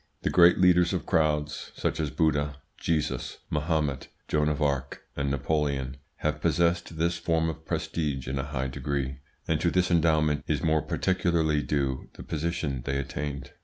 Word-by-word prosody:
The - - +1
great 90 -1 +7
leaders 90 -1 +5
of - - -2
crowds, 75 -2 0
such - - -1
as 75 -2 0
Buddha, 75 -2 +1 0.2
Jesus, 75 -6 -1
Mahomet, 75 -3 0 0.2
Joan 75 0 +2
of 75 0 -1
Arc, 70 -3 -1
and 70 -1 -1
Napoleon, 70 -1 -1 0.2
have 75 0 -2
possessed 85 0 +1
this 85 +1 +1
form 80 -1 +1
of 80 0 -7
prestige 75 -6 -2
in 65 +1 -2
a 70 - -2
high 65 -1 -2
degree, 65 0 -3 0.3
and - - +1
to - - +3
this 90 -1 +1
endowment 80 -3 +3
is - - 0
more 80 -1 +3
particularly 85 -5 +1
due 70 -3 -1
the - - -10
position 80 -4 -2
they 70 +2 -1
attained. 70 0 -4
75 Hz, 165 wpm, -28 LUFS, 70-80 Hz, 0.3 s, great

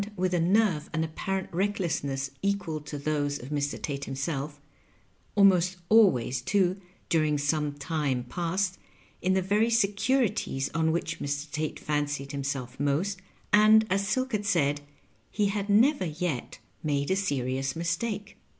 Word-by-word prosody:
193 180 -2 +1
mth - - +1
a 170 +3 +1 0.2
nerve 150 -2 -6
and 160 0 0
apparent 190 +4 -3
recklessness 165 -8 -1
equal 195 -6 -1
to 150 0 -7
those 145 0 -1
of 130 -1 -10
Mr. 145 -1 -2
Tate 140 -2 -4
himself 140 +1 -4 0.4
— - - -37
almost 190 -2 +4
always, 135 - +4
too, 190 +5 +1 0.3
during 155 -3 +2
some 145 0 0
time 145 -4 -1
past, 180 +8 -2 0.4
in 185 - +2
the 190 - +2
very 210 +4 +2
securities 215 - +1
on 160 0 +2
which 170 - -2
Mr. 145 +1 -3
Tate 155 0 -3
fancied 145 -2 -2
himself 135 -3 -4
most, 165 +8 0 0.3
and, 215 +1 +7
as 200 +1 +1
Silk 260 +5 0
had 205 -2 -1
said, 145 -6 +2 0.5
he 205 -2 +1
had 200 0 -2
never 225 +2 +4
yet 160 -4 -3 0.2
made 145 0 0
a - - +3
serious 135 -7 -1
mistake. 200 +5 -3
165 Hz, 150 wpm, -28 LUFS, 145-200 Hz, 0.5 s, and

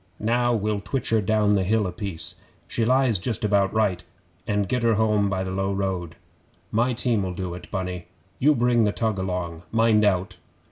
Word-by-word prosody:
Now 120 +3 +1
we'll 105 -1 -1
twitch 130 +5 -3
her 110 -1 +3
down 105 +1 +2
the 100 - +2
hill 105 +2 +1
a 90 - -2
piece 100 -6 -5 0.3
she 115 - -1
lies 130 -4 +3
just 110 +2 -2
about 100 -2 +2
right 100 -5 0 0.4
and 105 -2 0
get 125 +5 0
her 115 -1 +3
home 105 -2 +2
by 95 -1 -1
the 95 - -4
low 95 +1 -1
road. 95 -4 -2 0.6
My 120 +4 +2
team'll 110 -7 -1
do 90 -1 -4
it, 90 - -9
Bunny; 90 -3 -4 0.3
you 150 +3 +4
bring 120 -1 +3
the 105 - +2
tug 110 -4 -1
along. 90 -3 -3
Mind 115 -1 +3
out! 95 -2 +1
105 Hz, 190 wpm, -24 LUFS, 95-115 Hz, 0.6 s, you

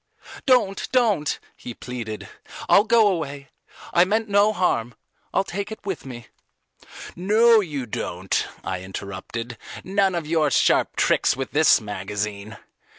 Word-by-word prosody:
"Don't, 220 -7 +2
don't," 215 - +2 0.2
he 120 - -9
pleaded. 115 -4 -6 0.4
"I'll 205 - +5
go 225 -1 +5
away. 145 -7 -3 0.4
I 175 - +6
meant 220 +4 0
no 205 +1 +4
harm. 125 - 0 0.4
I'll 190 - +2
take 200 +2 -5
it 220 - -9
with 190 -8 -4
me." 120 -2 -9 0.9
"No 220 +5 +5
you 150 -10 -3
don't," 95 -4 -2 0.2
I 95 -1 -4
interrupted; 100 +5 -7 0.2
"none 195 -1 +1
of 170 -3 -3
your 155 -1 +2
sharp - - +2
tricks - - +2
with 135 -1 -4
this 155 +2 +5
magazine. 105 +1 -5
155 Hz, 135 wpm, -23 LUFS, -, 0.9 s, I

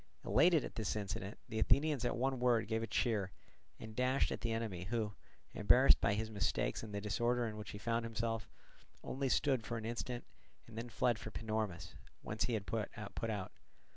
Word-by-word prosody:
Elated 165 -3 +5
at - - -7
this 110 -3 -1
incident, 100 -1 -4
the 110 - -3
Athenians 145 +2 +3
at 120 - 0
one 130 +1 0
word 120 -3 +3
gave 110 0 0
a 115 - -2
cheer, 105 -3 +1 0.5
and 110 -1 -8
dashed 130 +2 +2
at - - -3
the 115 - -1
enemy, 110 -6 -2
who, 110 0 -1 0.4
embarrassed - - +6
by 100 - +3
his 110 +1 -2
mistakes 100 -1 0
and 110 - -7
the 100 - -2
disorder 120 +4 +1
in 110 -2 -4
which 105 -2 -7
he - - -6
found 115 +2 0
himself, 115 -1 -2 0.5
only 135 0 -1
stood 130 -3 +2
for 115 +1 -3
an 110 - -5
instant, 120 +1 -3 0.4
and 115 - -13
then 115 +2 -5
fled 120 0 +1
for - - -6
Panormus, 110 -6 -3 0.3
whence 105 0 -1
he 120 - 0
had 100 -2 -3
put 110 -1 -2
out. 105 -1 -3
115 Hz, 195 wpm, -36 LUFS, 105-120 Hz, 0.5 s, embarrassed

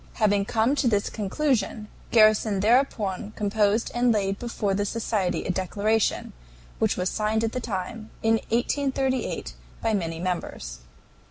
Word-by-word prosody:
Having 205 -2 +2
come 225 +5 +2
to 270 - +2
this 205 -3 +1
conclusion, 225 0 -1 0.2
Garrison 215 -3 +4
thereupon 215 -3 +1
composed 210 +1 +1
and 240 0 +3
laid 195 -2 0
before 225 -4 -2
the 205 +1 0
society 205 -3 -1
a - - 0
declaration, 205 +4 0 0.5
which - - +1
was 180 - 0
signed 215 +3 0
at 225 - 0
the 255 - -3
time 215 +1 -5
in 225 0 +3
1838 265 +2 -1 0.3
by 225 -1 0
many 165 -5 -2
members. 170 - -4
215 Hz, 140 wpm, -25 LUFS, 195-230 Hz, 0.5 s, Garrison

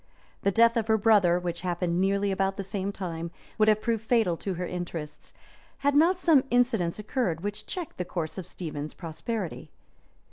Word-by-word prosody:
The - - +2
death 230 +3 +4
of 225 -1 0
her 220 0 +4
brother, 200 -5 +4
which 175 -1 -3
happened 175 -1 0
nearly 200 +1 +2
about 195 0 0
the 200 - -3
same 195 0 -3
time, 170 -4 -5 0.3
would 215 - +5
have 215 0 +3
proved 225 -2 0
fatal 225 -7 +2
to 190 +1 -3
her 180 +1 -3
interests, 165 -4 -6 0.5
hail 285 - +4
not 330 +6 +4
some 325 -7 +4
incidents 235 -9 +2
occurred 210 -6 -1
which 205 +2 -4
checked 355 -4 -5
the 180 - -1
course 165 0 -4
of 180 - -7
Stephen's 155 -5 -6
prosperity. 180 +3 -5
195 Hz, 180 wpm, -28 LUFS, 175-225 Hz, 0.5 s, would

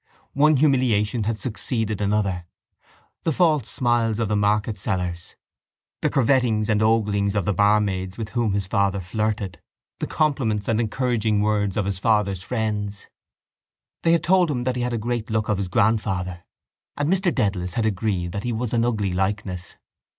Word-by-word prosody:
One 150 +2 +4
humiliation 125 -6 +2
had 115 0 -1
succeeded 110 -3 -2
another—the 100 - -4
false 155 - +2
smiles 120 -3 +1
of 115 -3 -1
the 105 - +1
market 105 0 +1
sellers, 90 -2 -3 0.7
the - - +2
curvetings 120 -4 +2
and 105 -1 +2
oglings 105 -2 +2
of 100 -4 0
the 100 - +1
barmaids 100 -2 +1
with 110 -2 -4
whom 115 -3 0
his 100 -1 -1
father 100 0 +1
flirted, 100 -1 -3 0.4
the - - -2
compliments 125 -9 0
and 115 -1 +1
encouraging 115 -2 0
words 105 -2 0
of 105 - +1
his 95 -1 -2
father's 100 -3 +1
friends. 105 -2 -3 1.0
They 165 - +3
had 165 -1 +2
told 180 -1 +4
him 125 -4 -1
that 130 0 -1
he 125 - -2
had 120 0 -1
a - - 0
great 120 0 -3
look 110 0 -1
of 105 -2 +1
his 100 - -2
grandfather 95 -3 0 0.5
and 145 - 0
Mr 185 +1 +2
Dedalus 95 - -1
had 115 - +1
agreed 95 -4 -1
that 100 +2 -4
he 120 - -1
was 115 0 -3
an 115 -1 +2
ugly 105 -6 0
likeness. 95 -1 -3
105 Hz, 165 wpm, -23 LUFS, 100-120 Hz, 1.0 s, One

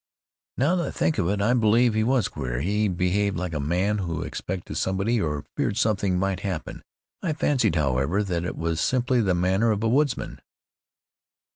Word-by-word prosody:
"Now 180 - +2
that 170 -4 -1
I - - -2
think 155 - 0
of 90 -2 +1
it, 100 0 0
I 115 +4 +3
believe 115 0 +3
he 110 0 +1
was 125 -2 +2
queer. 60 -3 -4
He 105 +6 +1
behaved 95 +1 0
like 90 -1 -3
a 75 - -2
man 90 +8 0
who 85 -4 -3
expected 90 -1 -5
somebody, 100 +5 0
or 75 -4 -2
feared 100 - -1
something 100 -4 +1
might 95 -1 0
happen. 90 -4 -5 0.4
I 165 - -1
fancied, 130 - +1
however, 70 +6 +1
that 90 -4 -2
it 90 - -4
was 80 -1 -1
simply 125 -1 +2
the 95 -4 +1
manner 95 +6 +2
of 105 0 0
a - - +2
woodsman." 140 +3 0
100 Hz, 185 wpm, -25 LUFS, 85-115 Hz, 0.4 s, I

